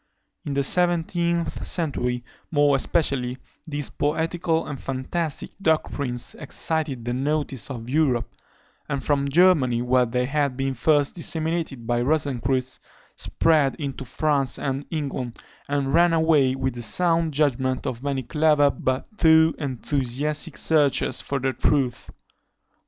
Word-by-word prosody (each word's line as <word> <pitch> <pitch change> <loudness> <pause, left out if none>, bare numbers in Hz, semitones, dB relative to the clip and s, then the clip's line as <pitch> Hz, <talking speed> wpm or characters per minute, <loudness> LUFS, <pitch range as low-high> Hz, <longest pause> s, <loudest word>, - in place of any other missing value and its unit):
In 140 - -3
the 140 - +1
seventeenth 170 +1 +1
century 125 -7 -2 0.3
more 145 -2 +3
especially, 135 -4 0 0.3
these 145 -2 -3
poetical 165 +2 -1
and 140 -3 -6
fantastic 140 +4 -3
doctrines 140 -7 -1
excited 150 -4 -2
the 120 - -1
notice 135 -3 -2
of 120 -4 -6
Europe; 130 -4 +1 0.6
and 140 -2 -2
from 140 -1 +1
Germany, 140 -7 +4
where 125 0 +3
they 125 +2 0
had 140 -1 -1
been 135 0 -1
first 145 +3 +2
disseminated 160 -6 -2
by 120 +1 0
Rosencreutz, 130 -2 -1 0.4
spread 155 -4 +2
into 140 -3 -5
France 135 0 0
and 135 +1 -3
England, 135 -6 -4 0.3
and 140 -1 -1
ran 170 +1 +5
away 155 -5 +3
with 130 -1 -2
the 120 - -7
sound 165 +8 +2
judgment 130 -3 0
of 120 -1 -3
many 140 -1 -2
clever 150 +2 +3
but 130 0 -2
too 160 -1 +5
enthusiastic 140 +3 -1
searchers 145 -4 +2
for 140 - -3
the 130 0 -1
truth. 130 -1 0
140 Hz, 130 wpm, -24 LUFS, 130-160 Hz, 0.6 s, ran